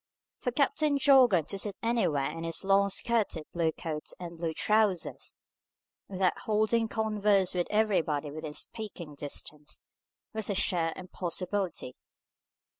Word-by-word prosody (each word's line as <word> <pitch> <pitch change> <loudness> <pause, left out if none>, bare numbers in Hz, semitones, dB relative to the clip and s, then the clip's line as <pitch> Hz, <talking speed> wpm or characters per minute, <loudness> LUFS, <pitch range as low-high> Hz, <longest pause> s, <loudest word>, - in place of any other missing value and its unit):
For 250 - -1
Captain 285 +2 +2
Jorgan 255 - +5
to 195 - -2
sit 200 0 0
anywhere 195 -12 +1
in 165 - -6
his 165 +3 -3
long 200 +1 +4
skirted 200 -6 0
blue 165 -2 +1
coat 155 -1 -5
and 170 -1 -7
blue 165 -1 -1
trousers, 210 -4 0 0.7
without 185 -1 0
holding 220 +1 +1
converse 210 -3 +2
with 175 -1 0
everybody 165 -9 +1
within 155 0 -6
speaking 190 -8 -4
distance, 145 +1 -5 0.5
was 220 -1 -2
a 200 - 0
sheer 170 -3 +2
impossibility. 185 -4 -3
190 Hz, 125 wpm, -29 LUFS, 165-220 Hz, 0.7 s, Jorgan